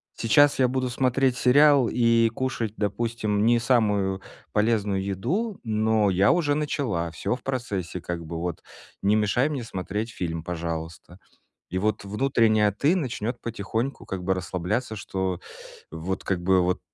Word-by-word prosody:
Сейчас 140 +5 +4
я 130 - +5
буду 130 0 -1
смотреть 130 0 +1
сериал 140 -1 +5
и 115 -1 +3
кушать, 120 -5 -2
допустим, 105 0 -1
не 120 0 +5
самую 105 -6 +1 0.3
полезную 105 -3 +1
еду, 170 - -2
но 110 -2 +2
я 95 +2 +4
уже 155 -5 +1
начала, 135 - -1
всё 85 +9 -2
в 125 - -12
процессе, 100 -9 -3
как 85 -1 -4
бы, 80 +1 -5
вот, 85 -1 -4 0.4
не 100 +2 +3
мешай 110 +7 +2
мне 140 -5 -3
смотреть 105 +2 -4
фильм, 85 -4 -4
пожалуйста". 85 0 -5 0.5
И 90 - -3
вот 105 +3 0
внутренняя 110 -1 +2
"ты" 145 - +2
начнет 120 - -3
потихоньку 115 +3 -3
как 95 -2 -5
бы 95 +1 +2
расслабляться, 95 +6 -2
что 95 -2 -3 0.5
вот 85 +4 -4
как 90 -3 -1
бы 95 +1 +3
вот 90 +1 0
110 Hz, 150 wpm, -25 LUFS, 95-125 Hz, 0.5 s, я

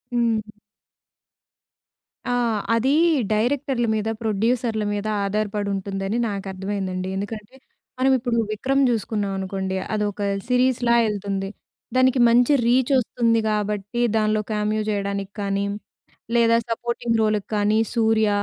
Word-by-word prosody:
హ్మ్. 230 -2 +2 1.9
ఆ! 245 - +1 0.4
అది 245 +4 +2 0.4
డైరెక్టర్‌ల 250 +2 0
మీద, 215 0 -2
ప్రొడ్యూసర్‌ల 225 +1 0
మీద 205 +1 -3 0.2
ఆధారపడి 205 0 -1
ఉంటుందని 195 +2 -3
నాకు 200 -1 -5
అర్థమైందండి. 190 -1 -3
ఎందుకంటే, 210 +4 -6 0.4
మనం 265 +1 +3
ఇప్పుడు 245 -1 -1
విక్రమ్ 270 +6 +1
చూసుకున్నాం 210 -3 -1
అనుకోండి, 190 0 -3 0.2
అదొక 210 -1 -2 0.3
సిరీస్‌ల 250 -1 +2 0.2
ఎళ్తుంది. 195 -2 -3 0.5
దానికి 255 0 +4
మంచి 245 +4 +4
రీచొస్తుంది. 240 -2 +2
కాబట్టి, 210 +2 -2 0.2
దానిలో 215 0 +1
కామియో 215 0 0
చేయడానికి 200 -1 -2
కానీ, 200 0 -1 0.7
లేదా 230 0 +4
సపోర్టింగ్ 235 0 -1
రోల్‌కి 215 -2 0
కానీ, 210 +1 +2 0.2
సూర్య 220 -2 +3
215 Hz, 105 wpm, -23 LUFS, 200-235 Hz, 1.9 s, దానికి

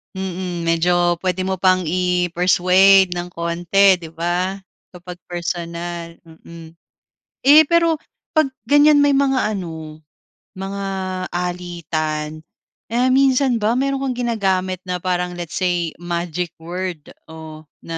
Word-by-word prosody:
Mm, 185 -2 -4
medyo 175 +1 +2
pwede 185 0 -1
mo 190 -1 -2
pang 185 -1 +3
i-persuade 180 +2 +3
ng 175 0 -4
konti 175 +3 +2
'di 165 - -9
ba, 175 +3 -1 0.4
kapag 180 0 -10
personal, 170 -1 -5
mm. 165 0 -13 0.7
Eh, 300 +3 +7
pero 335 0 +2 0.3
'pag 310 -4 +1
ganyan 290 +4 +5
may 285 - +4
mga 270 -2 +2 0.2
ano, 160 -4 -7 0.6
mga 195 +1 -5 0.5
alitan, 160 -3 -4 0.5
ah, 245 +2 +2
minsan 265 -1 +3
ba 220 0 +1
meron 275 0 -1
kang 255 -2 -3
ginagamit 190 -4 -1
na 180 -1 -3
parang 180 0 -1
let's 170 -2 -6
say 175 -3 -1
magic 175 0 -4
word 175 -1 -5 0.2
o 160 -1 -10 0.2
na 165 0 -6
180 Hz, 120 wpm, -20 LUFS, 170-195 Hz, 0.7 s, Eh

